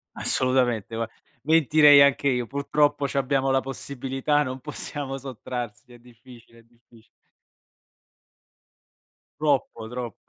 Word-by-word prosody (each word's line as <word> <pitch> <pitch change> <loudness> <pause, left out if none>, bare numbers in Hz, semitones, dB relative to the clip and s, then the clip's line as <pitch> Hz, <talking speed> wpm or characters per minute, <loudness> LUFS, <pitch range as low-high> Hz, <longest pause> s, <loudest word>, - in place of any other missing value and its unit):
Assolutamente, 125 -4 0
gua 115 0 -2 0.4
mentirei 150 -1 +6
anche 140 0 +3
io. 125 -2 -1
Purtroppo, 145 +1 0
c'abbiamo 135 0 0
la 135 0 +2
possibilità, 135 +2 -2
non 130 -1 -5
possiamo 140 -1 -6
sottrarsi, 125 -2 -7
è - - -14
difficile, 120 -1 -18
è - - -20
diffic 115 -1 -24 2.3
Troppo, 140 -6 -1
troppo. 120 -3 -6
130 Hz, 105 wpm, -24 LUFS, 120-140 Hz, 2.3 s, mentirei